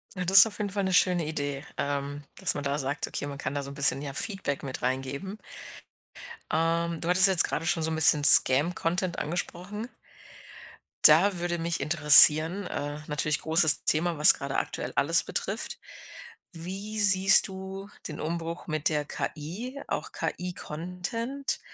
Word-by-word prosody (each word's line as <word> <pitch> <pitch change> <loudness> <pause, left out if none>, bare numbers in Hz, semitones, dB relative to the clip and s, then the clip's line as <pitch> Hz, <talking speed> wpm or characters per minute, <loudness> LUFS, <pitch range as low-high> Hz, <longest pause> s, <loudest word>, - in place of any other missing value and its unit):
Ja, 180 - -5
das 190 +2 +1
ist 195 - +7
auf 215 - -9
jeden 205 -1 -4
Fall 200 +1 -4
'ne 190 - -3
schöne 180 -2 +1
Idee, 145 -2 -6
ähm, 140 0 -6 0.2
dass - - +1
man 145 - -6
da 140 0 -3
sagt: 140 +1 -5
„Okay, 145 - -7
man 140 -1 -9
kann 135 -1 -6
da 145 - -4
so 140 - -10
'n - - -11
bisschen, 140 -1 +2
ja, 140 -2 -8
Feedback 190 -4 -3
mit 135 -2 -8
reingeben.“ 135 +10 -5 1.1
Ähm, 165 +1 -3
du 170 - -5
hattest 185 +2 +6
jetzt 190 -3 +5
grade 165 - -5
schon 165 -1 -1
so 160 - -2
'n - - -4
bisschen 155 -2 +4
Scam-Content 170 +6 +3
angesprochen. 180 +7 -6 1.2
Da 175 +5 +4
würde 175 0 -4
mich 165 0 -4
interessieren, 155 +4 +7
äh, 145 -1 -7
natürlich 150 0 -1
großes 160 -1 +3
Thema, 165 +1 -1
was 150 - +8
grade 140 0 -7
aktuell - - -5
alles - - +2
betrifft. - - -5 0.7
Wie 195 +6 -8
siehst 195 -2 +4
du 190 +1 -10 0.2
den 150 - -10
Umbruch 165 +1 -7
mit 155 -1 -2
der 150 -2 -3
KI, 185 - -8
auch - - -6
KI-Content? 180 - -6
165 Hz, 165 wpm, -25 LUFS, 145-185 Hz, 1.2 s, was